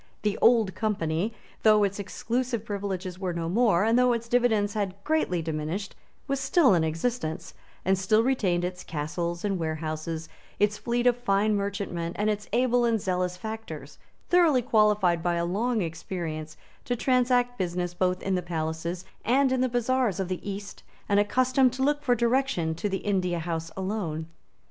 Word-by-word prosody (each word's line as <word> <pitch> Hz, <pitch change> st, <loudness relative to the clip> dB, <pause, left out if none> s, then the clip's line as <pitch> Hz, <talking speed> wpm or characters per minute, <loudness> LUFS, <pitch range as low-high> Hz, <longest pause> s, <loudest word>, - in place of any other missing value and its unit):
The 210 Hz, -1 st, +1 dB
Old 225 Hz, -5 st, +5 dB
Company, 195 Hz, -2 st, -1 dB, 0.3 s
though 215 Hz, -1 st, +5 dB
its 200 Hz, 0 st, -1 dB
exclusive 235 Hz, +3 st, -2 dB
privileges 190 Hz, -3 st, -4 dB
were 185 Hz, -2 st, -2 dB
no 170 Hz, -1 st, -3 dB
more, 205 Hz, -1 st, +3 dB
and 225 Hz, +3 st, +3 dB
though 250 Hz, -1 st, +4 dB
its 235 Hz, 0 st, -3 dB
dividends 225 Hz, -4 st, +2 dB
had 200 Hz, -3 st, -2 dB
greatly 245 Hz, -, 0 dB
diminished, 160 Hz, +5 st, -3 dB, 0.3 s
was 275 Hz, -1 st, -1 dB
still 270 Hz, -, +4 dB
in 170 Hz, -3 st, +3 dB
existence, 160 Hz, +1 st, -2 dB, 0.3 s
and 190 Hz, +1 st, +4 dB
still 205 Hz, +4 st, +2 dB
retained 190 Hz, -9 st, +1 dB
its 180 Hz, 0 st, -5 dB
castles 170 Hz, +4 st, -3 dB
and 195 Hz, -3 st, 0 dB
warehouses, 160 Hz, 0 st, -3 dB, 0.3 s
its 210 Hz, 0 st, +2 dB
fleet 240 Hz, +1 st, -1 dB
of 245 Hz, -1 st, +5 dB
fine 210 Hz, -3 st, +2 dB
merchantmen, 200 Hz, -4 st, -3 dB
and 210 Hz, +1 st, +1 dB
its 210 Hz, 0 st, -5 dB
able 245 Hz, +1 st, +3 dB
and 230 Hz, -2 st, +2 dB
zealous 180 Hz, -1 st, -1 dB
factors, 180 Hz, -10 st, -7 dB, 0.3 s
thoroughly 330 Hz, -8 st, +4 dB
qualified 210 Hz, -7 st, +3 dB
by 175 Hz, 0 st, 0 dB
a 170 Hz, 0 st, 0 dB
long 215 Hz, +4 st, 0 dB
experience 160 Hz, -2 st, -5 dB, 0.3 s
to 245 Hz, -, 0 dB
transact 245 Hz, -1 st, +2 dB
business 175 Hz, -1 st, -2 dB
both 180 Hz, +1 st, 0 dB
in 195 Hz, -, 0 dB
the 180 Hz, -, +1 dB
palaces 170 Hz, +1 st, -3 dB, 0.2 s
and 265 Hz, +3 st, +3 dB
in 260 Hz, -1 st, +1 dB
the 255 Hz, -, +2 dB
bazaars 245 Hz, -4 st, +1 dB
of 190 Hz, -2 st, -2 dB
the 185 Hz, +2 st, -4 dB
East, 200 Hz, +1 st, -7 dB, 0.3 s
and 205 Hz, -1 st, +3 dB
accustomed 255 Hz, +4 st, +3 dB
to 265 Hz, +1 st, -2 dB
look 290 Hz, +1 st, +2 dB
for 250 Hz, -4 st, +2 dB
direction 235 Hz, -8 st, +1 dB
to 205 Hz, +6 st, -3 dB
the 195 Hz, -1 st, -3 dB
India 185 Hz, -4 st, 0 dB
House 165 Hz, 0 st, -3 dB
alone. 185 Hz, -5 st, -3 dB
200 Hz, 170 wpm, -27 LUFS, 175-240 Hz, 0.3 s, Old